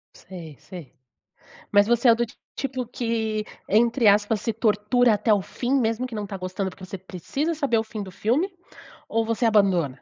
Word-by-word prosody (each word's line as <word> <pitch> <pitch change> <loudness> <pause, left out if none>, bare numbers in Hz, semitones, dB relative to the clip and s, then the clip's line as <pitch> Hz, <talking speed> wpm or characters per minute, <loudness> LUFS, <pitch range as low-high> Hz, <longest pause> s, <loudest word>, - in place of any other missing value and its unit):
Sei 170 -5 -10
sei, 175 -7 -11 0.8
mas 205 0 +5
você 240 +1 +4
é - - +8
do 240 +1 0
ti 235 - -17 0.2
tipo 260 -2 -3
que 225 -3 -2 0.2
entre 230 +2 +3
aspas 205 +1 +2
se 230 - -1
tortura 225 +2 +2
até 210 +1 +2
o 205 - +2
fim, 245 +7 -3
mesmo 230 +1 0
que 250 - -8
não 210 -2 -4
tá 195 - -6
gostando, 185 +1 -3
porque 185 - -14
você 195 - -7
precisa 190 - -3
saber 280 -6 +1
o - - -1
fim 220 -1 -6
do 190 - -9
filme, 270 - 0 0.6
ou 225 0 +1
você 230 +1 0
abandona? 185 - +2
220 Hz, 190 wpm, -24 LUFS, 195-240 Hz, 0.8 s, é